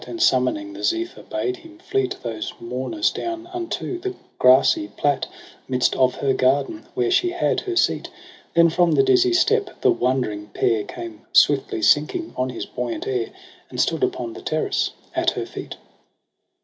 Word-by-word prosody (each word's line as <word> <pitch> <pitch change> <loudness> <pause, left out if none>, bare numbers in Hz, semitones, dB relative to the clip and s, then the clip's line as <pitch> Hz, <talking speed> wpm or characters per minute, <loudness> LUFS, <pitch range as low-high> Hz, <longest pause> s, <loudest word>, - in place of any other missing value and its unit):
And 345 - -6
summoning 315 -3 +2
the - - -8
Zephyr 340 +1 -1
bade 375 -1 -3
him 330 -1 -15
fleet 390 +2 -1
Those 110 -3 -4
mourners 130 - -1
down 340 -1 -4
unto 355 0 -3
the 380 +1 -4 0.2
grassy 125 -5 +5
plat 140 +7 0 0.4
'Midst 125 -1 +1
of 130 -1 +3
her 135 -1 +1
garden, 140 - +1
where 385 -1 +1
she 360 -1 +3
had 355 - 0
her 375 -4 -4
seat. - - +1 0.5
Then 170 0 +6
from 175 0 +3
the - - +5
dizzy 375 -2 +4
steep 405 +3 +3
the - - +5
wondering 120 -5 -1
pair 110 -2 +1
Came 115 -2 -8
swiftly 135 -6 +4
sinking 155 - +2
on 130 0 -1
his 125 - -5
buoyant 120 -2 -4
air. 125 -3 -1 0.4
And - - -7
stood - - +1
upon 345 -3 -1
the 385 - -9
terrace 370 - 0 0.3
at - - +3
her - - -2
feet. - - -8
315 Hz, 165 wpm, -22 LUFS, -, 0.5 s, Then